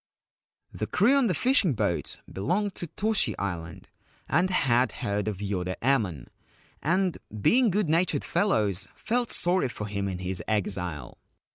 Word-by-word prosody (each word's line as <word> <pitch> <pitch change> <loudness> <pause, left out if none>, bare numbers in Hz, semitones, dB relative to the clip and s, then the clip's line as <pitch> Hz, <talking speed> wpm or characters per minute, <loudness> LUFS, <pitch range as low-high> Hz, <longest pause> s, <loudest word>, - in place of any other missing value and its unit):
The - - -3
crew 235 +6 +3
on 275 -4 +4
the 180 - +1
fishing 245 - +3
boat 85 -6 -2
belonged 190 - -1
to 175 - -5
Toshi 205 - +1
Island, 85 -4 -5 0.4
and 180 +5 +2
had 130 - +2
heard 105 0 -2
of 105 -3 -2
Yoda 90 -3 -2
Emon, 110 - 0 0.6
and, 180 +2 +1 0.2
being 240 - +4
good 205 -1 +1
natured 165 +4 +1
fellows, 105 - +1
felt 240 +1 -1
sorry 175 -5 +2
for 105 - -5
him 100 -1 -3
in 95 -2 -3
his 95 0 -4
exile. 95 -7 -2
120 Hz, 145 wpm, -27 LUFS, -, 0.6 s, on